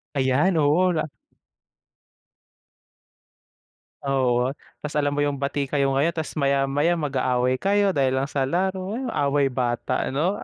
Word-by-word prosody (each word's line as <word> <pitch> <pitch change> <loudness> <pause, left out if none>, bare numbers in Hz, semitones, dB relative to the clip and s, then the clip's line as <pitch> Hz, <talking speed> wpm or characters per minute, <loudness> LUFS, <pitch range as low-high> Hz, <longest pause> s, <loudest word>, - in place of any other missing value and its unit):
Ayan, 140 +7 +2
oo, 160 +5 +3
na 155 -2 -2 2.9
Oo, 130 -1 +1 0.2
tapos 150 0 -6
alam 145 -1 +1
mo 145 - -1
yung 145 -1 0
bati 140 0 -2
kayo 140 -1 +1
ngayon, 155 +5 +1
tapos 160 - -3
maya-maya 140 +4 +1
mag-aaway 130 -4 0
kayo 200 0 +2
dahil 130 -3 +1
lang 135 - +1
sa 135 -2 0
laro. 190 +4 -1
Yung 255 -3 -4
away 140 -2 +1
bata 120 -2 -1
ano, 170 +10 -1
145 Hz, 130 wpm, -24 LUFS, 135-165 Hz, 2.9 s, oo